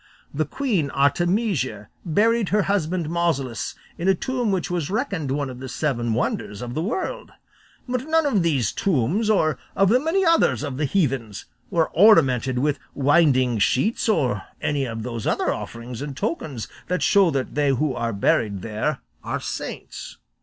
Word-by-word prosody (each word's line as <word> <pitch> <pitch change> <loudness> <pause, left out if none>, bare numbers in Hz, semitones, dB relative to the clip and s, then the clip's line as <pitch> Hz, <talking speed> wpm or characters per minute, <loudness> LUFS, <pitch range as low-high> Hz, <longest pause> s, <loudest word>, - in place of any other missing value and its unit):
The 155 +2 0
queen 215 - -1
Artemisia 140 - 0
buried 215 +5 +2
her 210 0 +2
husband 180 -4 0
Mausolus 150 -9 -1 0.2
in 175 - -1
a 195 - +5
tomb 245 +2 -1
which 185 -2 -1
was 170 -5 -1
reckoned 200 - -2
one 140 +1 -1
of 125 -1 -8
the 130 0 -7
seven 120 -5 -1
wonders 105 -2 -2
of 120 0 -5
the 155 - -2
world; 220 - -3 0.5
but 255 +2 -2
none 325 0 +3
of 220 -10 +2
these 140 - +1
tombs, 195 - 0
or 155 -9 +2 0.2
of 195 -1 +4
the 245 +4 +5
many 335 +7 +1
others 330 - +3
of 140 -3 -4
the 150 - 0
heathens, 135 - -1 0.2
were 165 -2 +1
ornamented 135 - +5
with 145 +2 0 0.2
winding 135 -5 +3
sheets 165 - +1
or 125 - +1 0.2
any 145 -2 0
of 115 -2 -5
those 115 -2 -4
other - - +1
offerings 115 +1 -7
and 145 -2 -6
tokens 145 -8 -3 0.2
that 180 +1 -1
show 200 -3 +5
that 135 -4 -2
they 145 -1 +1
who 135 +1 +1
are 115 -1 -2
buried 100 -1 +1
there 115 +7 -2 0.2
are - - -3
saints." - - -6
150 Hz, 165 wpm, -23 LUFS, 125-195 Hz, 0.5 s, a